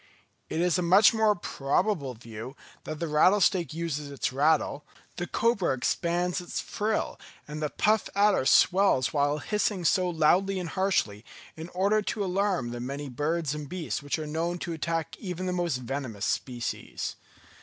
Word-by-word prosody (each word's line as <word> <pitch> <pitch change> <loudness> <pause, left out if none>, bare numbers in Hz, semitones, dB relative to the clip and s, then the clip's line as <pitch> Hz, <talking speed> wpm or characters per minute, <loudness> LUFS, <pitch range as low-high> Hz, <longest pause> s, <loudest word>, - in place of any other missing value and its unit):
It 165 - -1
is 180 +1 +2
a - - +1
much 190 +6 +6
more 220 -2 +3
probable 145 - -1
view 115 +3 -9 0.3
that 155 -1 -5
the 170 - -2
rattlesnake 175 +3 +3
uses 155 -3 -3
its 140 -2 -3
rattle, 150 +1 +2 0.3
the 175 - -3
cobra 215 - +1
expands 175 +6 0
its 175 - -4
frill 215 +1 -2 0.3
and 150 +1 -6
the 150 - 0
puff 215 +5 +1
adder 200 -9 +3
swells 185 -9 +4
while 145 0 +2
hissing 205 +1 -1
so 180 +2 +3
loudly 175 +4 +2
and 180 -3 -4
harshly, 170 - 0 0.3
in 160 +2 -8
order 200 +4 +2
to 205 0 -2
alarm 185 -9 0
the 120 - -5
many 140 +3 -5
birds 150 +3 -1
and 150 -2 -6
beasts 160 - -3
which 145 +2 -2
are 155 - -4
known 165 +3 -2
to 170 -1 -4
attack 165 0 -2
even 185 -2 -4
the 180 - -1
most 175 -6 0
venomous 125 -4 -4
species. 120 -2 -3
170 Hz, 165 wpm, -28 LUFS, 145-185 Hz, 0.3 s, much